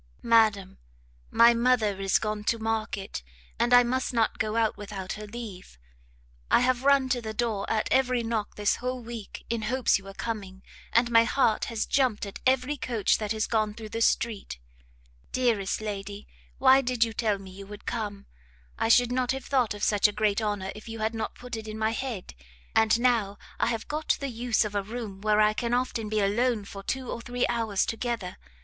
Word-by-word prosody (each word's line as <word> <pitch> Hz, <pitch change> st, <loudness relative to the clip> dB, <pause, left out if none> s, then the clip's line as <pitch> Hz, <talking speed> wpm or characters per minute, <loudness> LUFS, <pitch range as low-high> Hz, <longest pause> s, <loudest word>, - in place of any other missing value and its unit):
Madam, 215 Hz, -5 st, +3 dB, 0.5 s
My 235 Hz, +1 st, +6 dB
mother 230 Hz, -5 st, +2 dB
is 195 Hz, -1 st, +3 dB
gone 215 Hz, -1 st, -3 dB
to 230 Hz, -, +2 dB
market, 220 Hz, -, -3 dB, 0.4 s
and 240 Hz, -, +2 dB
I 245 Hz, 0 st, +8 dB
must 255 Hz, +1 st, -1 dB
not 225 Hz, -2 st, +1 dB
go 215 Hz, 0 st, -1 dB
out 225 Hz, -1 st, +2 dB
without 195 Hz, -2 st, -6 dB
her 210 Hz, 0 st, -8 dB
leave; 205 Hz, -, -9 dB, 0.7 s
I -, -, +5 dB
have 255 Hz, 0 st, +1 dB
run 280 Hz, -1 st, +4 dB
to 245 Hz, -1 st, 0 dB
the 220 Hz, -1 st, -6 dB
door 220 Hz, -4 st, -1 dB
at 215 Hz, -1 st, 0 dB
every 255 Hz, -2 st, +2 dB
knock 225 Hz, -2 st, -2 dB
this 205 Hz, -1 st, +1 dB
whole 255 Hz, +1 st, -3 dB
week 230 Hz, -3 st, -8 dB
in 230 Hz, -1 st, -2 dB
hopes 245 Hz, +1 st, +2 dB
you 195 Hz, -, -16 dB
were 195 Hz, 0 st, -10 dB
coming, 195 Hz, -5 st, -5 dB, 0.3 s
and 240 Hz, +1 st, +3 dB
my 230 Hz, 0 st, +7 dB
heart 230 Hz, -3 st, +2 dB
has 230 Hz, -2 st, -2 dB
jumpt 255 Hz, -7 st, +1 dB
at 200 Hz, -, -8 dB
every 260 Hz, +3 st, +2 dB
coach 235 Hz, -6 st, +1 dB
that 210 Hz, -2 st, -3 dB
has 220 Hz, 0 st, 0 dB
gone 215 Hz, -2 st, 0 dB
through 220 Hz, -1 st, -8 dB
the 225 Hz, +1 st, -4 dB
street. 220 Hz, -, 0 dB, 0.7 s
Dearest 225 Hz, -6 st, 0 dB
lady, 205 Hz, -1 st, -6 dB, 0.3 s
why 265 Hz, +1 st, +6 dB
did 250 Hz, -2 st, +1 dB
you 225 Hz, -1 st, -2 dB
tell 215 Hz, -3 st, 0 dB
me 195 Hz, -1 st, -11 dB
you 195 Hz, +1 st, -10 dB
would 210 Hz, 0 st, -11 dB
come? 205 Hz, -4 st, -4 dB, 0.5 s
I 225 Hz, -, +1 dB
should 245 Hz, +1 st, +5 dB
not 250 Hz, -1 st, 0 dB
have 265 Hz, -1 st, -6 dB
thought 250 Hz, -6 st, +1 dB
of 205 Hz, -, -7 dB
such 205 Hz, 0 st, +4 dB
a -, -, -3 dB
great 210 Hz, 0 st, +1 dB
honour 205 Hz, -3 st, -2 dB
if 215 Hz, +2 st, -11 dB
you 225 Hz, -, -6 dB
had 220 Hz, +1 st, -1 dB
not 220 Hz, -1 st, -4 dB
put 245 Hz, -1 st, -7 dB
it 220 Hz, -1 st, -7 dB
in 215 Hz, 0 st, -6 dB
my 220 Hz, 0 st, +1 dB
head. 230 Hz, -5 st, -5 dB, 0.4 s
And 220 Hz, +1 st, +4 dB
now 230 Hz, -5 st, +2 dB, 0.2 s
I -, -, +2 dB
have 230 Hz, -1 st, -2 dB
got 305 Hz, +1 st, 0 dB
the 275 Hz, -, -3 dB
use 235 Hz, -1 st, +1 dB
of 210 Hz, -, -5 dB
a 205 Hz, -, 0 dB
room 210 Hz, -2 st, -7 dB
where 215 Hz, 0 st, +2 dB
I 215 Hz, 0 st, +5 dB
can 235 Hz, +2 st, -1 dB
often 245 Hz, -3 st, -2 dB
be 215 Hz, 0 st, +1 dB
alone 215 Hz, +2 st, +1 dB
for 200 Hz, 0 st, -8 dB
two 260 Hz, +5 st, -3 dB
or 235 Hz, -, -5 dB
three 245 Hz, +1 st, -1 dB
hours 225 Hz, -4 st, 0 dB
together. 225 Hz, -5 st, -3 dB
225 Hz, 205 wpm, -27 LUFS, 210-240 Hz, 0.7 s, I